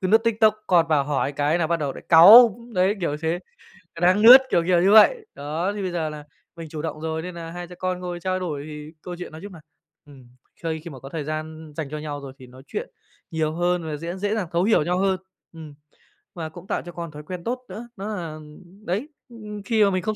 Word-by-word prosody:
cứ 185 - -1
lướt 220 +4 +6
TikTok, 220 -1 +3
con 170 -3 +4
vào 150 -3 +2
hỏi 145 -1 -1
cái 145 +4 0
là 165 - +1
bắt 170 +1 +1
đầu 145 -3 -2
lại - - -11
cáu. 210 +7 +9 0.2
Đấy, 185 +2 +2
kiểu 160 -4 -1
thế, 165 +2 0 0.6
ờ, 165 - -10
đang 185 +4 +4
lướt, 250 +4 +10
kiểu 170 - +2
kiểu 175 -2 +4
như 190 +3 +4
vậy. 430 - +6
Đó, 155 +7 -3
thì 205 - -4
bây 185 -2 -3
giờ 165 -3 -2
là 150 -1 -8 0.3
mình 165 -2 -9
chủ 150 0 -6
động 155 - -5
rồi, 160 0 -3
nên 180 +1 -7
nà 165 -1 -7
hai 175 +1 -7
cha 180 - -12
con 185 -1 -2
ngồi 175 -1 -5
trao 185 +1 -2
đổi 155 -6 -4
thì 150 0 -9
câu 180 - -7
chuyện 180 - -7
nói 155 +1 -10
chung 200 -1 -9
là, 170 - -12 0.5
ừm, 135 -4 -16 0.4
khơi 160 -1 -2
khi 170 - -8
mà 135 -4 -10
có 135 - -10
thời 155 0 -4
gian 155 +1 -6
dành 155 -4 -4
cho 155 - -5
nhau 150 -1 -5
rồi 135 -1 -9
thì 130 - -12
nói 130 +1 -15
chuyện - - -5 0.4
nhiều 155 -1 -1
hơn 175 +1 0
và 155 -2 -4
dễ 170 +3 -5
dễ 205 +3 -1
dàng 210 -5 -2
thấu 170 +1 +1
hiểu 210 -6 +3
nhau 180 +3 -1
hơn. 190 -1 +1 0.4
Ừm. 160 -3 -10 0.6
Và 160 -3 -5
cũng 175 +3 -13
tạo - - -2
cho 175 - -8
con 170 -2 -7
thói 150 0 -10
quen 175 +2 -7
tốt 245 +5 -2
nữa, 235 +2 -8
đó 195 +2 -6
là 165 -4 -6 0.5
đấy, 205 - -2 0.2
ừm, 210 -3 -9
khi 225 -3 +3
mà 200 - +4
mình 185 -1 -1
không 215 0 -2
170 Hz, 260 wpm, -23 LUFS, 155-190 Hz, 0.6 s, lướt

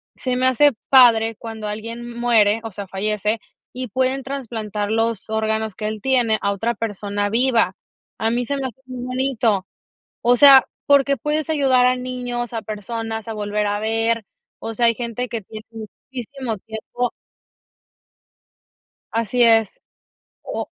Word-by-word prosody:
“Se 255 -1 -2
me 255 - +2
hace 270 +3 +5 0.2
padre 230 -4 +6
cuando 220 -2 -6
alguien 230 +3 -6
muere, 225 -2 +3
o 225 - -6
sea, 200 0 -7
fallece, 210 +3 -1 0.3
y 255 -1 -5
pueden 260 +4 0
trasplantar 225 -7 -4
los 225 -2 0
órganos 220 -1 -1
que 210 - -5
él 215 -1 -4
tiene 240 -3 +2
a 200 - +1
otra 225 +4 -1
persona 205 -1 -2
viva”. 230 -4 +2 0.4
A 225 +1 +1
mí 245 +1 0
se 280 +3 -2
me 270 - -3
hace 255 +2 -12
muy 255 -1 -6
bonito. 250 -6 0 0.5
O 245 +1 +4
sea, 275 -1 +9 0.2
porque 280 -1 +4
puedes 300 0 -1
ayudar 265 -4 +3
a 255 - +3
niños, 245 -1 -4
a 225 - -3
personas 225 +1 -5
a 225 - -3
volver 210 0 -1
a 205 0 -1
ver, 225 +1 0 0.3
o 225 - -5
sea, 235 +1 +3
hay 230 - +3
gente 240 +1 -4
que 230 - -3
tiene 215 +2 -10 0.5
muchísimo 255 -2 -5
tiempo 225 +3 -4 2.0
Así 230 +2 +1
es, 225 -3 +3 0.6
o - - -4
230 Hz, 155 wpm, -21 LUFS, 215-250 Hz, 2.0 s, sea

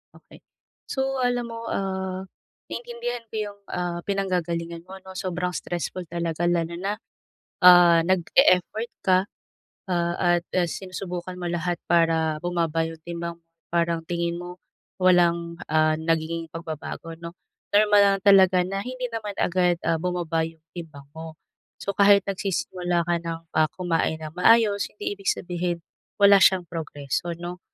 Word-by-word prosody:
Okey. - - -17 0.5
So 265 0 -1
alam 245 -1 +1
mo, 230 0 -6
ah, 190 -1 -3 0.4
naintindihan 240 0 -5
ko - - -9
yung, 205 -1 -4
ah, 175 -1 -3
pinanggagalingan 170 -4 -2
mo 190 - -8
'no. 190 - -9
Sobrang 180 -1 -3
stressful 175 +1 -4
talaga 170 0 -1
lalo 170 -1 0
na 200 +4 -2 0.7
ah 175 -2 +8
nag 185 -1 +2
e-effort 220 -1 +4
ka, 185 -1 +5 0.7
ah, 175 -1 0 0.2
at 170 - -20
ah, 180 - +3
sinusubukan 185 0 -6
mo 180 - -5
lahat 175 0 -1
para 165 -2 +2
bumaba 165 -2 0
yung 165 -1 -11
timbang 170 0 -5
mo. 165 - -38 0.3
Parang 170 -1 +1
tingin 170 0 -2
mo, 175 0 -8 0.4
walang, 170 -2 +3
ah, 155 0 +3
nagiging 165 0 -1
pagbabago, 165 0 -6
'no. 170 0 -7 0.4
Normal 205 0 +6
lang 200 -1 +4
talaga 190 -2 +6
na 195 +2 -3
hindi 255 +2 -5
naman 215 -3 -4
agad, 180 -1 +2
ah, 165 0 +2
bumaba 175 -2 -1
yung 165 -1 -16
timbang 155 -5 -9
mo. 160 0 -8 0.4
So 200 - -2
kahit 200 -1 +6
nagsisimula 180 -3 -1
ka 175 - +2
ng, 165 -1 -5 0.2
ah, 155 -1 +4
kumain 170 -3 0
nang 155 -1 -7
maayos, 210 0 +4
hindi 205 -1 -4
ibig 195 - -1
sabihin 175 -1 -3 0.4
wala 200 0 +8
siyang 185 0 +5
progreso 160 0 -4
'no. 175 +1 -7
175 Hz, 145 wpm, -25 LUFS, 170-195 Hz, 0.7 s, ah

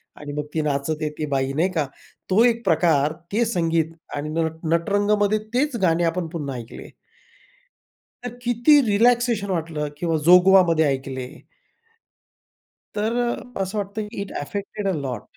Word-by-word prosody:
आणि 145 -1 -8
मग 150 0 -3
ती 160 - 0
नाचते 150 +1 -1
ती 155 - -2
बाई 135 0 0
नाही 165 +6 +1
का, 155 -5 0 0.4
तो 210 +5 +5
एक 235 -1 +2
प्रकार, 155 -3 +3 0.2
ते 230 +3 +2
संगीत 165 -6 0 0.2
आणि 145 +1 -4
नट 160 0 -1 0.2
नटरंगमध्ये 205 +4 +2
तेच 280 +1 +1
गाणे 170 -1 +2
आपण 170 +1 -1
पुन्हा 145 -5 -5
ऐकले. 120 -1 -9 1.4
तर 245 -1 -5
किती 245 +5 +4
रिलॅक्सेशन 230 -1 +2
वाटलं 160 -4 -2
किंवा 165 0 -1
जोगवामध्ये 180 -2 +6
ऐकले. 130 -2 -3 1.7
तर 220 +3 0
अ, 245 -2 -6
असं 195 +3 -3
वाटतं, 200 +2 -3
की 210 -1 -7
इट 200 - -8
ॲफेक्टेड 200 +5 -4
अलॉट. 135 - -3
175 Hz, 140 wpm, -23 LUFS, 150-210 Hz, 1.7 s, जोगवामध्ये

